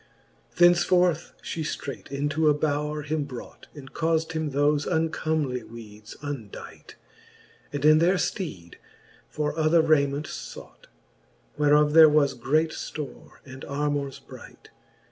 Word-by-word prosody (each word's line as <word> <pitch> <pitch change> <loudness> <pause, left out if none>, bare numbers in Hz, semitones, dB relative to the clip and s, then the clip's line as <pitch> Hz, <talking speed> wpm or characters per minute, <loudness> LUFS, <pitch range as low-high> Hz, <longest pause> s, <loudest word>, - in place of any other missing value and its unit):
XLL - - -33
Thence 175 0 +6
forth 180 -3 +1
fhe 165 - -4
ftreight 140 -3 -5
into 145 +3 +1
a 150 - +3
bowre 150 0 -2
him 150 0 -1
brought, 130 -4 -10
And 135 -2 -12
caufd 160 0 0
him 160 -1 -2
thofe 145 +2 +1
uncomely 160 -5 -1
weedes 110 -2 -12
undight, 135 -8 -8 0.8
And 145 0 -3
in 155 0 +7
their 175 +4 +3
fteed 100 - -4 0.5
for 150 -1 -2
other 160 +1 +3
rayment 145 -2 +2
feught. - - -10 0.7
Whereof 150 0 +4
there 160 -1 +9
was 145 -2 +3
great 155 +6 0
ftore, 150 -2 -7
and 130 0 -11
armours 145 -1 -2
bright. - - -14
150 Hz, 130 wpm, -25 LUFS, 140-160 Hz, 0.8 s, there